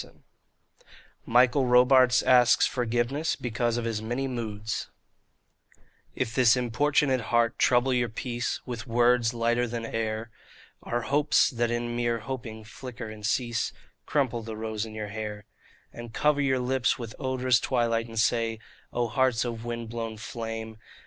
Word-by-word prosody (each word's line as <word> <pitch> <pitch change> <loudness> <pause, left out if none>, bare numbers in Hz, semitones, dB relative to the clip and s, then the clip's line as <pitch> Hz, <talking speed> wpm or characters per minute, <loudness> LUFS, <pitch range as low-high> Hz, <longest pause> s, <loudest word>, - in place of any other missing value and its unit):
36 - - -16 1.0
MICHAEL 125 +3 +4
ROBARTES 125 0 +5
ASKS 125 -1 +5
FOR 125 -1 -1
GIVENESS 120 +7 0
BECAUSE 120 0 -1
OF 120 - -2
HIS 115 -2 -2
MANY 120 +5 -2
MOODS 110 -5 -4 1.3
If 115 - -2
this 125 -1 +5
importunate 130 +2 +1
heart 115 0 +1
trouble 125 +1 +3
your 120 -1 +1
peace 120 +2 -3
With 120 0 -6
words 120 0 +3
lighter 120 +1 +1
than 115 0 -4
air, 110 0 -3 0.5
Or 120 0 -2
hopes 145 +5 +3
that 120 -2 0
in 120 0 -2
mere 120 -1 0
hoping 115 -2 -6
flicker 115 +1 -8
and 105 -1 -11
cease; 120 +1 -1 0.3
Crumple 130 -5 0
the 110 -1 -7
rose 110 0 -3
in 110 - -10
your 105 -1 -5
hair; 105 -1 -6 0.5
And 120 -1 -9
cover 145 +4 +2
your 135 -2 +2
lips 130 0 +1
with 115 -2 -7
odorous 130 -3 +2
twilight 115 -2 0
and 115 -1 -9
say, 115 0 +1 0.2
' - - -30
O 120 -1 0
Hearts 125 0 +1
of 115 -1 -5
wind 115 -1 -4
blown 115 -1 -5
flame 110 -1 -6
120 Hz, 155 wpm, -27 LUFS, 115-125 Hz, 1.3 s, ROBARTES